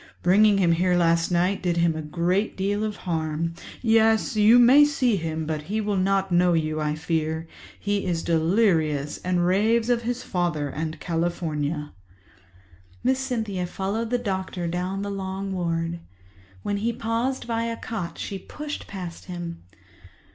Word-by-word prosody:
Bringing 205 Hz, +3 st, +5 dB
him 180 Hz, -3 st, +3 dB
here 180 Hz, +2 st, +2 dB
last 170 Hz, -1 st, +3 dB
night 180 Hz, +3 st, +1 dB
did 175 Hz, -2 st, 0 dB
him 170 Hz, -1 st, +2 dB
a 160 Hz, -, -3 dB
great 175 Hz, +7 st, -1 dB
deal 200 Hz, +2 st, 0 dB
of 215 Hz, -1 st, -2 dB
harm. 165 Hz, -1 st, -1 dB, 0.3 s
Yes, 225 Hz, +1 st, +3 dB
you 215 Hz, +3 st, +6 dB
may 250 Hz, +4 st, +8 dB
see 260 Hz, -6 st, +2 dB
him, 160 Hz, -3 st, -3 dB
but 155 Hz, -1 st, -2 dB
he 215 Hz, +2 st, 0 dB
will 205 Hz, -1 st, -1 dB
not 195 Hz, 0 st, +1 dB
know 175 Hz, 0 st, +4 dB
you, 155 Hz, -1 st, 0 dB
I 150 Hz, 0 st, 0 dB
fear—he 160 Hz, +5 st, -3 dB
is 170 Hz, -3 st, -1 dB
delirious 160 Hz, -4 st, +1 dB
and 180 Hz, -1 st, 0 dB
raves 220 Hz, +6 st, +2 dB
of 235 Hz, -1 st, +2 dB
his 245 Hz, +2 st, -3 dB
father 170 Hz, -, -1 dB
and 155 Hz, +2 st, -4 dB
California." 160 Hz, -3 st, -2 dB, 1.1 s
Miss 260 Hz, +1 st, +2 dB
Cynthia 220 Hz, -9 st, -2 dB
followed 200 Hz, +5 st, -3 dB
the 245 Hz, -, +1 dB
doctor 190 Hz, -5 st, -3 dB
down 180 Hz, +3 st, -2 dB
the 200 Hz, -, -3 dB
long 195 Hz, 0 st, -4 dB
ward. 170 Hz, -1 st, -2 dB, 0.6 s
When 205 Hz, -, -1 dB
he 230 Hz, +3 st, -1 dB
paused 230 Hz, +4 st, -2 dB
by 230 Hz, -1 st, -1 dB
a 230 Hz, 0 st, -3 dB
cot, 215 Hz, -7 st, -5 dB
she 195 Hz, -, -5 dB
pushed 300 Hz, +9 st, -7 dB
past 180 Hz, -4 st, -7 dB
him. 175 Hz, -2 st, -6 dB
185 Hz, 155 wpm, -25 LUFS, 165-215 Hz, 1.1 s, may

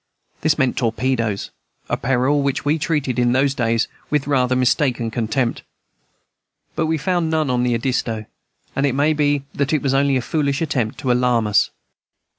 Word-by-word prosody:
This 155 Hz, -1 st, +2 dB
meant 130 Hz, -1 st, +1 dB
torpedoes, 115 Hz, -3 st, -1 dB, 0.4 s
a -, -, 0 dB
peril 135 Hz, +3 st, +1 dB
which 140 Hz, 0 st, -1 dB
we 150 Hz, +2 st, +2 dB
treated, 145 Hz, -5 st, -1 dB
in 120 Hz, 0 st, +3 dB
those 135 Hz, +1 st, +2 dB
days, 115 Hz, -3 st, 0 dB, 0.2 s
with 150 Hz, -2 st, 0 dB
rather 130 Hz, -3 st, +2 dB
mistaken 125 Hz, -2 st, +1 dB
contempt. 115 Hz, +2 st, -1 dB, 1.1 s
But 160 Hz, -, 0 dB
we 160 Hz, 0 st, +1 dB
found 170 Hz, +1 st, 0 dB
none 155 Hz, -4 st, +1 dB
on 125 Hz, -1 st, +1 dB
the 125 Hz, -1 st, +1 dB
Edisto, 115 Hz, -3 st, -2 dB, 0.5 s
and 140 Hz, +1 st, +2 dB
it 135 Hz, -, -1 dB
may 145 Hz, +3 st, +3 dB
be 145 Hz, -2 st, +1 dB
that 140 Hz, +1 st, -1 dB
it 155 Hz, -, +1 dB
was 135 Hz, -1 st, +1 dB
only 135 Hz, 0 st, +3 dB
a -, -, -1 dB
foolish 140 Hz, -1 st, 0 dB
attempt 135 Hz, -9 st, -1 dB
to 130 Hz, -4 st, +1 dB
alarm 125 Hz, -2 st, +2 dB
us. 105 Hz, -1 st, +3 dB
135 Hz, 175 wpm, -20 LUFS, 120-145 Hz, 1.1 s, in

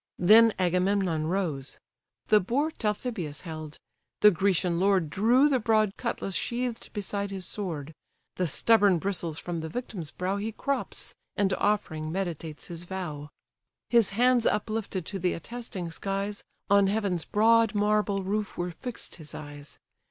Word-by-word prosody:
then 220 Hz, +5 st, +7 dB
Agamemnon 180 Hz, -3 st, +1 dB
rose: 160 Hz, -7 st, -2 dB, 0.5 s
The 215 Hz, -, +7 dB
boar 270 Hz, -, 0 dB
Talthybius 210 Hz, -, -3 dB
held: 155 Hz, -3 st, -7 dB, 0.4 s
the 210 Hz, -, +8 dB
Grecian 180 Hz, -2 st, +1 dB
lord 190 Hz, -5 st, +2 dB
Drew 240 Hz, -, +4 dB
the 270 Hz, -3 st, +2 dB
broad 215 Hz, -3 st, +2 dB
cutlass 230 Hz, -5 st, -3 dB
sheath'd 240 Hz, +3 st, -3 dB
beside 200 Hz, -1 st, -3 dB
his 190 Hz, -2 st, -4 dB
sword: 160 Hz, -8 st, -4 dB, 0.4 s
The 180 Hz, -, +1 dB
stubborn 205 Hz, -, +4 dB
bristles 170 Hz, -3 st, -2 dB
from 175 Hz, 0 st, -4 dB
the 160 Hz, 0 st, -5 dB
victim's 185 Hz, -6 st, -5 dB
brow 185 Hz, +5 st, -2 dB
He 215 Hz, +2 st, -3 dB
crops, 280 Hz, +5 st, -2 dB, 0.2 s
and 195 Hz, -2 st, +2 dB
offering 160 Hz, -7 st, 0 dB
meditates 165 Hz, -4 st, -4 dB
his 170 Hz, 0 st, -7 dB
vow. 175 Hz, -6 st, -5 dB, 0.6 s
His 235 Hz, -4 st, +5 dB
hands 245 Hz, -1 st, +4 dB
uplifted 210 Hz, -4 st, -1 dB
to 195 Hz, +2 st, -4 dB
the 180 Hz, 0 st, +1 dB
attesting 195 Hz, -3 st, -6 dB
skies, 195 Hz, +3 st, -3 dB, 0.2 s
On 200 Hz, -1 st, +5 dB
heaven's 195 Hz, -5 st, 0 dB
broad 225 Hz, +1 st, +3 dB
marble 205 Hz, -1 st, +1 dB
roof 205 Hz, +2 st, -2 dB
were 175 Hz, 0 st, -2 dB
fixed 235 Hz, +5 st, -7 dB
his 155 Hz, -3 st, -9 dB
eyes. 145 Hz, -1 st, -9 dB
195 Hz, 145 wpm, -28 LUFS, 170-215 Hz, 0.6 s, the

